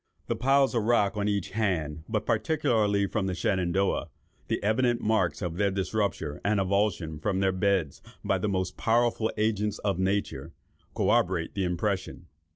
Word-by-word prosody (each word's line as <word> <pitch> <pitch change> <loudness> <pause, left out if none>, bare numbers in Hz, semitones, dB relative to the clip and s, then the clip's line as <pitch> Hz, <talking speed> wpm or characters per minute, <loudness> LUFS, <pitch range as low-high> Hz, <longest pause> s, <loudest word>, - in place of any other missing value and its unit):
The - - -1
piles 135 +2 +3
of 115 - +1
rock 110 -3 +2
on 105 -1 -1
each 100 -3 -1
hand, 80 -8 -1
but - - -1
particularly 105 -10 +1
on 100 -3 0
the 95 - -2
Shenandoah—the 95 +1 -2
evident 120 +3 +2
marks 105 -3 0
of 85 -1 -3
their 100 0 +2
disrupture 95 -5 -2
and 100 0 +2
avulsion 95 -5 0
from 95 +3 0
their 95 -1 +2
beds 95 -5 0 0.2
by - - +1
the 105 - -1
most 95 -2 -2
powerful 115 -1 +1
agents 105 -1 0
of 100 -3 0
nature, 95 -6 -1 0.4
corroborate 90 -2 +1
the 95 -2 -1
impression. 90 +1 -2
100 Hz, 155 wpm, -27 LUFS, 90-110 Hz, 0.4 s, piles